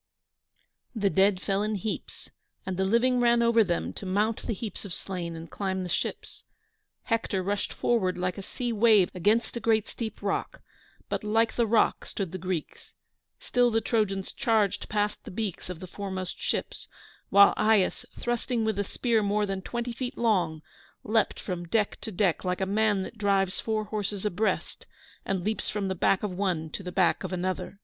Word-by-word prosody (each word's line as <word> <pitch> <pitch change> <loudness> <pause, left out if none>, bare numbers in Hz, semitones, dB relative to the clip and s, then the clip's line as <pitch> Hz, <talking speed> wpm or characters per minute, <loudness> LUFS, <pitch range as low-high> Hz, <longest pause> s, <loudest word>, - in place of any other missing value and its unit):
The 200 -3 +1
dead 195 0 +4
fell 195 +1 0
in 215 0 0
heaps, 205 +2 -5 0.3
and 190 - -2
the 190 +1 +1
living 240 +5 +3
ran 235 -1 +4
over 230 -1 +5
them 175 -4 -1
to - - -8
mount 210 +4 +1
the 230 - 0
heaps 210 0 -6
of 195 -4 -6
slain 175 -3 -5
and 165 +1 -8
climb 190 +1 -2
the 180 - -5
ships. 175 - -3 0.6
Hector 225 -5 0
rushed 200 +2 -1
forward 190 -7 +1
like 180 +2 -2
a - - -4
sea 240 +4 -3
wave 215 -4 +5
against 210 +8 +1
a - - -2
great 220 -1 +2
steep 220 -3 -6
rock, 200 - -2 0.4
but - - -2
like 225 +2 +2
the 235 -2 +2
rock 220 +1 +3
stood 190 -5 -4
the 185 - -5
Greeks; 180 -3 -5 0.4
still 245 0 +2
the 225 -1 +2
Trojans 205 -4 0
charged 220 -7 +1
past 210 0 -1
the - - -9
beaks 200 -3 -4
of 180 -3 -6
the 185 - -7
foremost 185 -1 -5
ships, - - -3 0.4
while 200 +1 +7
Aias, 215 -3 +3
thrusting 240 -1 -1
with 220 -2 0
a - - +2
spear 230 +2 +1
more 205 +1 +1
than 195 -1 -3
twenty 240 +3 -3
feet 250 +1 -5
long, 175 -9 +1 0.4
leaped 220 +1 +1
from 175 -2 -4
deck 210 +3 0
to 220 - -5
deck 185 -3 +1
like 180 -1 -1
a 190 - +1
man 205 0 +2
that 220 - -9
drives 195 -2 +2
four 220 -1 -1
horses 205 -1 -3
abreast, 210 +2 -1 0.4
and 190 -2 -1
leaps 215 +2 -1
from 200 -2 -2
the - - 0
back 190 +2 +2
of 210 - -1
one 180 -4 -1
to - - -5
the 180 -1 -6
back 185 -2 +2
of - - -4
another. 185 +2 -3
205 Hz, 190 wpm, -28 LUFS, 185-220 Hz, 0.6 s, while